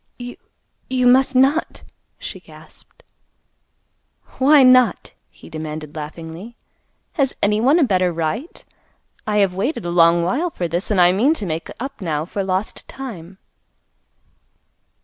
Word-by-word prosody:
"You—you 250 +1 -6
must 265 +2 +4
not," 275 +5 +2 0.3
she - - -8
gasped. - - -15 1.4
"Why 280 +1 +6
not?" 255 -1 +4 0.2
he - - -17
demanded 155 -1 -7
laughingly. 165 +8 -8 0.6
"Has 275 -4 -1
anyone 220 +9 +3
a 340 - +4
better 185 -7 +2
right? 170 - -4 0.6
I 210 -1 0
have 195 -3 +2
waited 200 - -2
a 175 - -2
long 170 0 +4
while 275 - 0
for 180 - -4
this, 170 +3 -3
and 205 -3 +1
I 175 0 +6
mean 250 - +2
to 210 - -5
make 160 -2 -4
up 265 -2 -7
now 155 -4 -2
for 195 +3 -4
lost 190 +2 -3
time." 195 -9 -9
200 Hz, 130 wpm, -20 LUFS, 170-255 Hz, 1.4 s, Why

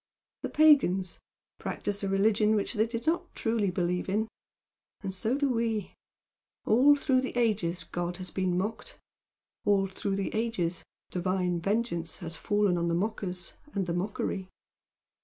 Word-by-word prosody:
The - - -3
pagans 230 - +4 0.4
practised 205 0 -3
a 195 - 0
religion 210 +2 +3
which 205 - 0
they 220 0 +2
did 230 0 -4
not 345 +2 0
truly 225 -3 +1
believe 180 0 -1
in, 215 +3 +1 0.7
and 195 -2 -4
so 225 +7 +1
do 285 0 +2
we. 230 -5 0 0.7
All 270 +6 +6
through 265 -2 +2
the 260 -1 -4
ages 205 -7 +1
God 175 0 -3
has 185 -1 -6
been 185 -2 0
mocked; 210 +5 -3 0.7
all 200 -2 +3
through 195 +1 -3
the 195 0 -2
ages 215 -7 -1 0.3
Divine 180 -1 0
vengeance 185 -4 -1
has 165 -2 -6
fallen 205 -1 +1
on 170 - 0
the 170 - +1
mockers 185 -2 -2 0.2
and 195 -2 +1
the 170 - -2
mockery. 190 0 -2
200 Hz, 150 wpm, -29 LUFS, 180-225 Hz, 0.7 s, All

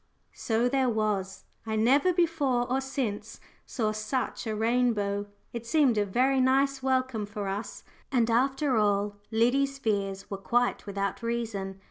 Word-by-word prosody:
So 230 +1 0
there 260 0 +2
was. 210 -4 -1 0.2
I 220 -1 -3
never 270 +11 +4
before 305 -8 +1
or 260 +2 0
since 225 -6 -4 0.3
saw 220 -4 -1
such 215 +3 -3
a 215 - -1
rainbow 215 -3 +1 0.3
it 235 -1 -6
seemed 285 -4 +3
a 205 -1 +1
very 260 +6 +2
nice 270 +1 +2
welcome 255 -5 0
for 205 -1 -5
us, 200 +3 -5 0.3
and 240 -4 +3
after 270 +3 +2
all, 205 -1 +1
Liddy's 260 +5 +2
fears 200 -6 -2
were 195 - -2
quite 240 +2 0
without 200 +1 -3
reason. 220 -5 -3
235 Hz, 145 wpm, -28 LUFS, 210-260 Hz, 0.3 s, never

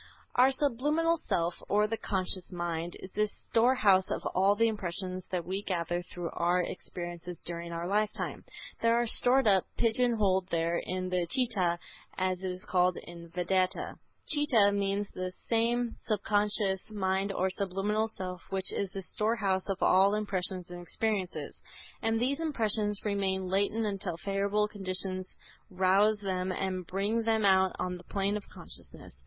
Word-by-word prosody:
Our 255 +2 +5
subliminal 295 +5 +1
self, 170 +1 +1 0.2
or 210 +1 +4
the 220 +1 -1
subconscious 185 -3 0
mind, 175 -1 -3
is 190 - -9
the 210 +1 +1 0.2
storehouse 220 -6 +4
of - - -2
all 195 +2 +4
the 230 +2 +3
impressions 185 -3 -3
that 180 -3 -2
we 190 +3 -2
gather 175 -3 -1
through 175 -1 -6
our 175 +1 +2
experiences 175 -1 -6
during 170 0 -5
our 170 0 -3
lifetime. 210 +2 -1 0.4
They 230 - +2
are 235 +1 +4
stored 255 +3 +4
up, 195 -3 +4
pigeon 240 +1 +3
holed 190 -3 +2
there, 170 +1 +1
in 185 0 -3
the 180 -2 0
Chitta, 205 -9 +2 0.4
as 185 -1 0
it 190 - -2
is 180 0 -5
called 180 -1 +3
in 170 -1 -10
Vedanta. 180 +2 0 0.3
"Chitta" 265 -10 +4
means 200 0 0
the 185 0 -4 0.2
same 235 +1 +1
subconscious 205 -2 +1
mind 195 -1 0
or 190 -1 0
subliminal 200 +3 0
self 185 -4 -5
which 190 -1 +1
is 200 - -1
the 195 0 -6
storehouse 205 -2 0
of 195 -1 -1
all 195 +2 +5
impressions 185 -3 -2
and 175 0 -7
experiences. 195 +1 -3 0.4
And 225 0 +1
these 270 +5 0
impressions 215 -9 0
remain 190 -2 0
latent 200 +4 +1
until 195 -4 -2
favorable 200 +3 0
conditions 185 -2 -3 0.3
rouse 190 +3 +3
them 185 -1 -1
and 185 -1 -3
bring 205 +5 0
them 220 -1 +1
out 190 -1 +4
on 180 0 -2
the 180 - -13
plane 200 +2 -1
of 210 - -6
consciousness. - - -8
195 Hz, 155 wpm, -30 LUFS, 185-215 Hz, 0.4 s, Our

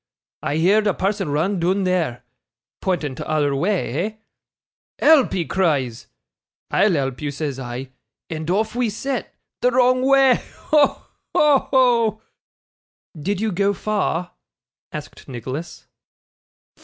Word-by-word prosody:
I 145 - -2
heerd 205 +6 +3
a 200 - +1
person 195 -3 -1
run 170 +7 0
doon 185 +3 +1
there" 165 -10 0 0.6
(pointing 165 -7 -1
t'other 145 +1 0
wa' 150 +7 0
eh?) 195 - -1 0.8
"Help!" 310 -5 +5
he 175 -3 -1
cries. 145 -12 0 0.6
"I'll 195 0 +3
help 135 -3 -1
you," 150 - -2
says 140 -1 -4
I; 125 +1 -6 0.4
and 160 0 -5
off 215 +4 +1
we 245 -2 +1
set 255 +4 -4 0.3
the 250 - +4
wrong 255 0 +3
wa'! 270 -1 +5
Ho! 300 -2 +1 0.3
ho! 290 -3 +4
ho!' 235 -5 +3 0.9
'Did 185 +6 -2
you 220 -1 0
go 200 +2 +1
far?' 190 -4 -1 0.6
asked - - -9
Nicholas. 135 +6 -6
185 Hz, 125 wpm, -21 LUFS, 150-220 Hz, 0.9 s, Help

